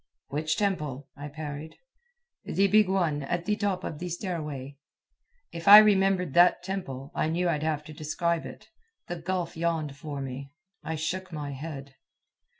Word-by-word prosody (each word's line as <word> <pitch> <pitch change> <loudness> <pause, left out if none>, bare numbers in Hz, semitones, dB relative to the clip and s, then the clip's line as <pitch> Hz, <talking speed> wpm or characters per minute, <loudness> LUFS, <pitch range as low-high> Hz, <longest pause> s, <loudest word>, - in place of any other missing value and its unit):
"Which 155 +2 -1
temple?" 150 - -2
I 145 +1 -7
parried. 150 +1 -7 0.7
"The 195 - +1
big 210 0 +5
one, 170 -6 +1
at 170 +5 -2
the 210 - +1
top 200 -3 -1
of 150 - -5
the 180 - -4
stairway." 150 -7 -5 0.7
If 170 +1 -7
I 205 +1 +13
remembered 195 -6 +4
that 175 +3 +5
temple, 145 -8 -5
I - - 0
knew 175 +3 0
I'd 150 -3 0
have 155 -1 -1
to 155 0 -10
describe 165 +2 -1
it. - - -12 0.4
The 175 - -3
gulf 180 0 -3
yawned 160 -3 -1
for 145 0 -6
me. 135 +1 -6 0.3
I 160 - -3
shook 180 +4 -3
my 150 -3 -4
head. 140 -2 -7
160 Hz, 160 wpm, -28 LUFS, 145-180 Hz, 0.7 s, I